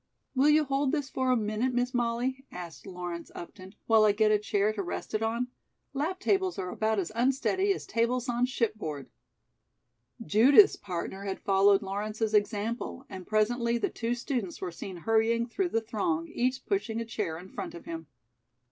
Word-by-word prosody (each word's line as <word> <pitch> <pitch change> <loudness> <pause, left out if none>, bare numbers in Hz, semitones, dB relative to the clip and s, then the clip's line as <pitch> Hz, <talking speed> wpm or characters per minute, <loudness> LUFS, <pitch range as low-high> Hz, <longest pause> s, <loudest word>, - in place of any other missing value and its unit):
"Will 275 +2 +4
you 305 +1 +5
hold 275 -1 0
this 290 -4 -2
for 260 0 0
a 255 - +4
minute, 220 +4 -1
Miss 245 +1 0
Molly," 245 +2 -1
asked 175 +1 -9
Lawrence 175 -2 -6
Upton, 185 +3 -10
"while 225 -1 +5
I 210 -1 +5
get 215 +1 +3
a 210 - +4
chair 210 0 +1
to 210 - -3
rest 180 - -5
it 215 - 0
on? 230 +3 -1 0.4
Lap 315 +7 -2
tables 380 -2 +1
are 180 - -3
about 220 0 0
as 190 -2 -1
unsteady 270 - +1
as 390 - -2
tables 235 +2 0
on 245 0 +1
shipboard." 215 - -3 1.1
Judith's 265 - +7
partner 190 +1 -5
had 195 -1 -3
followed 195 +1 +4
Lawrence's 210 +3 -2
example, 215 +5 -1
and 185 -2 -8
presently 235 +2 +1
the - - 0
two 235 +1 -2
students 240 - -3
were 185 -2 -4
seen 180 +2 -7
hurrying 225 +4 +2
through 355 +10 -1
the 225 - 0
throng, 195 -8 -1
each 255 +2 -1
pushing 310 - -1
a 230 - -3
chair 165 -7 -3
in 180 +3 -10
front - - -6
of 170 - -10
him. 165 -1 -6
225 Hz, 180 wpm, -29 LUFS, 195-255 Hz, 1.1 s, Judith's